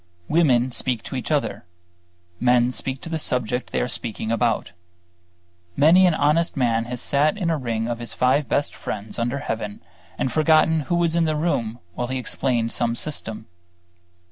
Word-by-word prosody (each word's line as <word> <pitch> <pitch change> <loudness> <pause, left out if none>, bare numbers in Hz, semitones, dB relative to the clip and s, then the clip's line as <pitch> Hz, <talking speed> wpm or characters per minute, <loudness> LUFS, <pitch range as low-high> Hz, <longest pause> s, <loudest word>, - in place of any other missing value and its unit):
Women 130 -6 +3
speak 120 -2 0
to - - -6
each 125 - -4
other; 140 -9 -1 0.8
men 125 0 +3
speak 130 +1 -3
to - - -8
the 160 -1 -2
subject 125 -3 -1
they - - 0
are - - 0
speaking 115 -2 -3
about. 115 -1 0 1.0
Many 175 +5 +6
an 170 - +2
honest 155 +3 +1
man 115 -3 +1
has 125 +1 -5
sat 150 - +2
in 175 -5 0
a 160 - +1
ring 115 -3 -2
of 120 -1 -3
his 120 -2 -5
five 130 +1 +2
best 145 - 0
friends 105 +3 -5
under 120 +4 -1
heaven 110 -6 -4 0.4
and 130 - -1
forgotten 160 0 +4
who 175 - +2
was 170 -1 +1
in 170 -1 +3
the 155 -1 0
room 140 -8 -1 0.2
while 120 +6 -3
he 130 +1 -2
explained 120 -2 -1
some 120 -1 0
system. 115 -6 -3
125 Hz, 175 wpm, -23 LUFS, 115-155 Hz, 1.0 s, Many